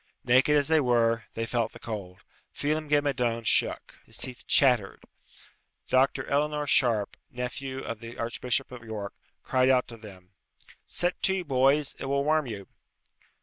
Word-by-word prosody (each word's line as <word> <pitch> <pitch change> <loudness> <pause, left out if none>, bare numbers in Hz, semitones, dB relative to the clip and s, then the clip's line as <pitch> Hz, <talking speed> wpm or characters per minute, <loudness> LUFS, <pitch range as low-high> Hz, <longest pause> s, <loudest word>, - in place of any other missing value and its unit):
Naked 130 +4 +4
as 145 - +2
they 160 0 +4
were, 115 -3 +2
they 115 - -2
felt 115 -1 -1
the - - -12
cold. 100 -5 -7 0.3
Phelem 155 +1 -2
ghe 145 0 +4
Madone 120 -5 -1
shook. - - 0
His - - -8
teeth 125 -1 -3
chattered. 125 -8 +3 0.9
Dr. 130 +1 +2
Eleanor 150 +1 0
Sharpe, 120 -7 +2
nephew 130 +1 -5
of 115 -1 -5
the 115 +1 -10
Archbishop 125 +3 -2
of 125 -2 -9
York, 105 -3 -6 0.3
cried 130 0 +2
out 130 -1 +3
to 115 - -9
them, 95 -4 -14 0.6
"Set 175 +1 -1
to, 190 -1 +2
boys; 140 0 +2
it - - -5
will 140 +1 0
warm 155 -1 +1
you." 100 -4 -7
125 Hz, 155 wpm, -27 LUFS, 115-140 Hz, 0.9 s, Naked